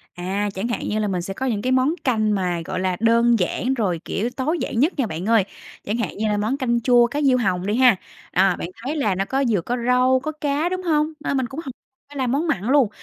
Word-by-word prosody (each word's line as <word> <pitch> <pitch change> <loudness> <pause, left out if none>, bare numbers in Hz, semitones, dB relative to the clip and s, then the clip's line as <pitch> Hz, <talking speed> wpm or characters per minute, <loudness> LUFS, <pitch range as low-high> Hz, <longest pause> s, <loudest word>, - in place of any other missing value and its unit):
À, 195 +4 -2
chẳng 195 +5 -3
hạn 240 - -3
như 215 - -1
là 210 - 0
mình 180 -3 -1
sẽ 195 - -5
có 260 +7 -4
những 220 -5 -1
cái 255 +3 -1
món 260 +4 +3
canh 215 -5 +1
mà, 180 -3 -1
gọi 185 0 -3
là, 185 -1 -1
đơn 230 0 +4
giản, 245 +8 0
rồi, 190 -9 -1
kiểu, 225 +4 -2
tối 275 +7 -2
giản 230 - -2
nhất 305 +8 +3
nha 265 - +1
bạn 165 0 -5
ơi, 225 -2 +4 0.4
chẳng 210 +3 -2
hạn 230 -5 -3
như 215 +1 0
là 210 -1 +1
món 220 +6 -1
canh 235 -3 0
chua 240 0 +5
cá 290 +5 -3
diêu 260 -3 +4
hồng 185 -5 0
đi 205 +2 0
ha, 250 -3 +6 0.4
à, 190 0 +3
bạn - - -5 0.2
thấy 285 +5 -2
là 215 -10 +1
nó 195 +1 -1
có 270 +6 0
vừa 205 -5 +1
có 245 +8 -2
rau, 255 +1 +4
có 310 - -2
cá, 300 +2 -1
đúng 370 0 -3
hông? 310 -2 +1
Nên 280 -2 -1
mình 260 - 0
cũng 270 +5 -7
hổ 265 - -5 0.4
phải 290 - -10
làm 255 -2 0
món 300 +5 0
mặn 200 - -1
luôn, 260 0 +3
235 Hz, 270 wpm, -22 LUFS, 200-265 Hz, 0.4 s, ha